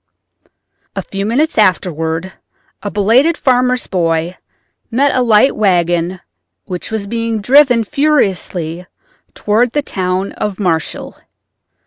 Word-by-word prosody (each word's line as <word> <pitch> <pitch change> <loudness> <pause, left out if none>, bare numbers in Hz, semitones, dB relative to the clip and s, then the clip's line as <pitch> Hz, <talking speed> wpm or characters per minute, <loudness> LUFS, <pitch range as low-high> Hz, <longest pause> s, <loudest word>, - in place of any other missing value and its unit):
A - - -3
few 195 +1 -4
minutes 280 +4 +1
afterward 180 -2 0 0.5
a 205 - -4
belated 235 +12 +2
farmer's 250 -1 +1
boy 165 -1 -1 0.5
met 270 +4 +2
a 255 - +2
light 230 +2 +4
wagon 175 -2 +1 0.4
which 180 -1 -6
was 220 -2 -3
being 230 +1 -2
driven 250 +1 +4
furiously 185 - -1 0.5
toward 225 +3 +1
the 295 - 0
town 185 -3 -2
of 210 -2 -4
Marshall. 165 -5 -2
205 Hz, 110 wpm, -15 LUFS, 180-245 Hz, 0.5 s, light